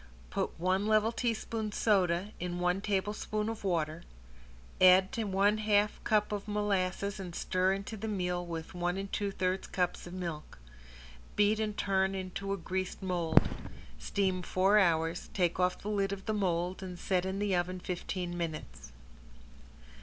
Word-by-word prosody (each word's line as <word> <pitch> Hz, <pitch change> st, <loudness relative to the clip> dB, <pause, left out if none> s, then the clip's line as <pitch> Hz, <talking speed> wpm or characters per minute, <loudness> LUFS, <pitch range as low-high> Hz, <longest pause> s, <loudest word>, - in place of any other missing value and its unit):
Put -, -, -2 dB
one 185 Hz, +4 st, +1 dB
level 215 Hz, +1 st, +4 dB
teaspoon 225 Hz, -2 st, -2 dB
soda 190 Hz, -2 st, +2 dB
in 175 Hz, 0 st, -3 dB
one 180 Hz, +2 st, +1 dB
tablespoon 210 Hz, +1 st, -1 dB
of 225 Hz, -2 st, -5 dB
water, 165 Hz, -4 st, 0 dB, 0.8 s
add 185 Hz, +1 st, +7 dB
to 230 Hz, -4 st, -2 dB
one 200 Hz, +2 st, +2 dB
half 210 Hz, -1 st, +2 dB
cup 210 Hz, -1 st, +2 dB
of 205 Hz, 0 st, -3 dB
molasses 200 Hz, -1 st, 0 dB
and 180 Hz, -3 st, -6 dB
stir 185 Hz, +1 st, +1 dB
into 200 Hz, +3 st, -5 dB
the 220 Hz, +1 st, -5 dB
meal 180 Hz, -4 st, -1 dB
with 165 Hz, -1 st, -6 dB
one 175 Hz, +1 st, -1 dB
and 195 Hz, 0 st, -5 dB
two 205 Hz, -1 st, 0 dB
thirds 185 Hz, -1 st, -1 dB
cups 180 Hz, -1 st, -1 dB
of 175 Hz, -, -9 dB
milk. 170 Hz, -5 st, -5 dB, 0.8 s
Beat 210 Hz, +1 st, +3 dB
and 215 Hz, -1 st, -2 dB
turn 190 Hz, 0 st, +1 dB
into 190 Hz, +1 st, -4 dB
a 200 Hz, -, 0 dB
greased 185 Hz, +2 st, -3 dB
mold. 175 Hz, -3 st, +3 dB, 0.5 s
Steam 190 Hz, -2 st, 0 dB
four 190 Hz, +3 st, +3 dB
hours, 165 Hz, -2 st, +1 dB
take 180 Hz, -2 st, +1 dB
off 180 Hz, 0 st, +2 dB
the -, -, -9 dB
lid 200 Hz, -2 st, 0 dB
of 195 Hz, -1 st, -5 dB
the 215 Hz, -, 0 dB
mold 180 Hz, -2 st, 0 dB
and 180 Hz, -2 st, -6 dB
set 180 Hz, 0 st, 0 dB
in 190 Hz, +1 st, -2 dB
the 200 Hz, -2 st, +1 dB
oven 180 Hz, +1 st, -1 dB
fifteen 180 Hz, 0 st, -4 dB
minutes. 160 Hz, -, -5 dB
190 Hz, 160 wpm, -32 LUFS, 180-205 Hz, 0.8 s, add